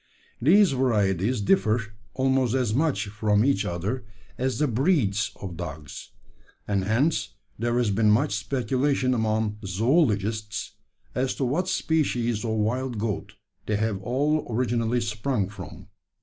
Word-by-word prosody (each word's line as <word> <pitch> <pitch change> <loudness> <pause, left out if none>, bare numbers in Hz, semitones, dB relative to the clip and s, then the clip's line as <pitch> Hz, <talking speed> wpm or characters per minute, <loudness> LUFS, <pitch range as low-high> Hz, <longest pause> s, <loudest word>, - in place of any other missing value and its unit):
These 185 - +6
varieties 110 -4 +1
differ 100 +3 +3 0.4
almost 130 -2 +2
as 125 -5 +1
much 150 -1 +1
from 105 +1 +2
each 105 -8 +2
other 100 +7 -3 0.3
as 130 0 -1
the 150 - +2
`breeds' 115 - +1
of 95 -3 -6
dogs; 80 -3 -7 0.6
and 100 -2 0
hence 125 +10 +1 0.2
there 120 +1 0
has 120 -4 +2
been 105 +2 +3
much 120 +7 +3
speculation 130 +5 0
among 110 -2 0
zoologists, 110 - 0 0.4
as 130 +1 -1
to 135 - -1
what 160 +9 0
species 120 - 0
of 115 - -2
wild 115 +3 -1
goat 105 -2 -3 0.3
they 105 - +1
have 105 -2 -1
all 145 +8 0
originally 120 0 0
sprung 110 -1 -1
from. 100 -3 -10
115 Hz, 135 wpm, -26 LUFS, 105-130 Hz, 0.6 s, These